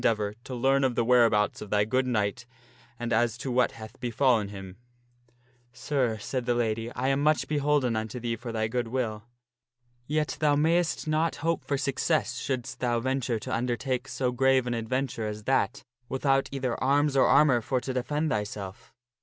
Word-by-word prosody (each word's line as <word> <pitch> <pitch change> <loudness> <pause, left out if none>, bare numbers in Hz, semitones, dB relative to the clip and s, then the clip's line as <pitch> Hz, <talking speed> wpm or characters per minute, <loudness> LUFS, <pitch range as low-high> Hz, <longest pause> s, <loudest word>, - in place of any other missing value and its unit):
deavor 105 -2 +1
to 130 - -6
learn 135 +3 +2
of 130 -2 +1
the 115 - +1
whereabouts 115 -4 +3
of 105 - -7
thy 105 0 +2
good 130 +4 +1
knight, 110 -1 -1 0.5
and 120 0 -2
as 115 +1 +2
to 130 0 -4
what 125 0 +2
hath 110 -1 -11
befallen 120 -3 +2
him." 95 -2 -9 0.5
" 120 +1 -36 0.3
Sir," 125 -4 -1
said 120 +3 -4
the 120 - +2
lady, 115 0 -1
" - - -14
I 130 +2 0
am 135 +1 +1
much 155 +1 +2
beholden 145 -5 +1
unto 110 +2 -3
thee 120 -1 -2
for 120 +1 -7
thy 110 -1 -1
good 120 +1 -2
will. 115 -3 -3 0.8
Yet 150 0 -1
thou 150 -2 +3
mayst 160 +1 +1
not 155 +2 +1
hope 165 -1 0
for 140 - -1
success 135 -1 0
shouldst 130 -1 -3
thou 120 -2 +1
venture 130 -1 -1
to 130 +4 -5
undertake 125 +2 -1
so 125 -2 -1
grave 130 0 +3
an 120 - -1
adventure 115 0 -2
as 105 0 -6
that 105 +1 0 0.3
without 135 0 +1
either 130 -3 -2
arms 140 +1 +2
or 135 - +5
armor 135 -6 +5
for 130 +3 -1
to 130 - -4
defend 150 +5 -1
thyself. 105 +2 -5
125 Hz, 185 wpm, -27 LUFS, 115-135 Hz, 0.8 s, or